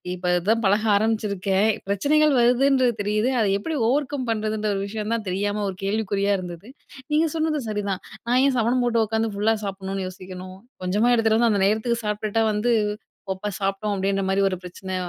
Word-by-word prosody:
இப்ப 180 - -9 0.2
அதான் 225 +5 +1
பழக 205 +2 +2
ஆரம்பிச்சிருக்கேன். 210 -1 +1 0.2
பிரச்சனைகள் 290 +9 +3
வருதுன்றது 250 +1 +3
தெரியுது, 210 +5 +1
அதை 215 - +2
எப்டி 315 +10 -4
ஓவர்கம் 285 -1 -1
பண்றதுன்ற 215 -1 -1
ஒரு 195 - -2
விஷயம் 215 +1 -4
தான் 225 -2 -4
தெரியாம 205 +3 -1
ஒரு 190 - -6
கேள்விக்குறியா 200 -1 0
இருந்தது. 180 +3 -8 0.4
நீங்க 310 +2 +3
சொன்னது 315 -1 0
சரிதான். 200 -3 -2 0.3
நான் 250 +2 +3
ஏன் 275 -2 +2
சமணம் 245 +2 +2
போட்டு 230 -2 +2
உட்காந்து 220 +1 -1
ஃபுல்லா 220 +2 +2
சாப்பிடணுன்னு 195 -1 -4
யோசிக்கணும், 185 0 -10 0.3
கொஞ்சமா 210 +7 +2
எடுத்துட்டு 220 -1 +3
வந்து 235 -2 +4
அந்த 200 - +1
நேரத்துக்கு 230 +2 0
சாப்பிட்டுட்டா 210 +1 0
வந்து 215 +4 +1 0.6
ஒப்ப 200 +2 -5
சாப்டோம் 195 +1 -1
அப்டின்ற 195 0 0
மாரி 190 +1 +1
ஒரு 185 - -3
பிரச்சனை 185 +1 -7
210 Hz, 165 wpm, -23 LUFS, 195-235 Hz, 0.6 s, வந்து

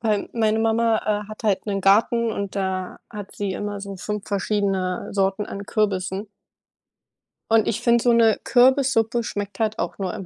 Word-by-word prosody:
weil 215 -3 0
meine 220 -1 +1
Mama, 225 0 +2 0.3
äh, - - -17
hat 215 +2 -10
halt 210 -1 0
'nen 195 -1 -1
Garten 225 +4 +3
und 200 -2 -4
da 190 -2 -3
hat 205 -3 -8
sie 200 -2 -3
immer 205 0 -4
so 200 -1 -7
5 210 +2 -5
verschiedene 195 -2 -1
Sorten 195 +1 0
an 200 +1 -7
Kürbissen. 200 -1 -1 1.2
Und 225 -1 +4
ich 210 - -1
finde 235 -1 +3
so 240 -1 +4
'ne 225 -2 +4
Kürbissuppe 245 -2 +3
schmeckt 205 -1 -5
halt 220 -1 0
auch - - -3
nur 185 -2 -2
im 195 - -7
210 Hz, 175 wpm, -23 LUFS, 195-225 Hz, 1.2 s, Und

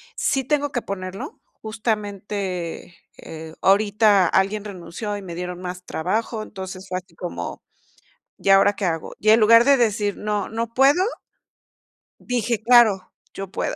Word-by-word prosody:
sí 270 -1 0
tengo 290 0 0
que 245 - -2
ponerlo, 185 -1 -7 0.2
justamente, 205 -6 -4 0.2
eh, 160 0 -9
ahorita 205 -1 +4
alguien 200 +3 +1
renunció 200 +2 -6
y - - -8
me 175 -3 -8
dieron 180 0 -5
más 180 0 -6
trabajo, 215 +6 -2
entonces 190 -2 -8
fue 185 -1 -2
así 180 -2 -22
como, 85 +1 -6 0.8
¿y 195 - -2
ahora 195 +1 +6
qué 200 - -6
hago?, 165 -2 -2
y 215 - +1
en 220 - +7
lugar 230 +2 +7
de 280 +1 +5
decir: 210 -3 0
"No, 210 -1 -2
no 230 +1 -2
puedo", 275 +7 +4 1.2
dije: 235 -2 -2
"Claro, 220 -5 +4 0.2
yo 195 -1 -6
puedo", - - -2
205 Hz, 150 wpm, -22 LUFS, 185-220 Hz, 1.2 s, en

